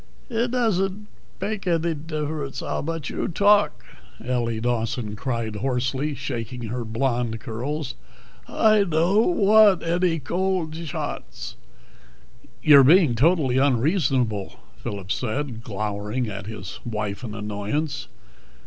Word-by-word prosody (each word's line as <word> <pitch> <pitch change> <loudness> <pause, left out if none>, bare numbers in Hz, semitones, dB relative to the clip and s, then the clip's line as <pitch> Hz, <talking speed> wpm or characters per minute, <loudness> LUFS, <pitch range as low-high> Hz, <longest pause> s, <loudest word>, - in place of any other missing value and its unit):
"It 235 +2 +1
doesn't 210 -4 0 0.3
bake 205 -3 -3
eddy 170 -1 +1
differets 150 -2 -4
how - - -1
much 165 -1 -4
you - - -2
talk," 205 +3 +3 0.4
Ellie 120 -3 0
Dawson 115 -2 -1
cried 115 -2 -3
hoarsely, 130 +5 -1
shaking 120 -1 -5
her 120 +1 -3
blonde 115 0 -1
curls. 130 +5 -4 0.5
"I 215 -2 +4
dod't 195 - +2
wadt 210 - +6
eddy 170 0 +1
cold 175 +2 -1
shots." 150 -8 -5 1.1
"You're 140 -3 +8
being 160 -1 +6
totally 135 0 +3
unreasonable," 130 - +1 0.2
Phillip 100 -2 -5
said, 120 -1 -2
glowering 105 +3 -3
at 100 -2 -6
his 105 -4 -7
wife 105 -2 -4
in 110 -3 -5
annoyance. 105 +8 -3
135 Hz, 115 wpm, -24 LUFS, 115-170 Hz, 1.1 s, You're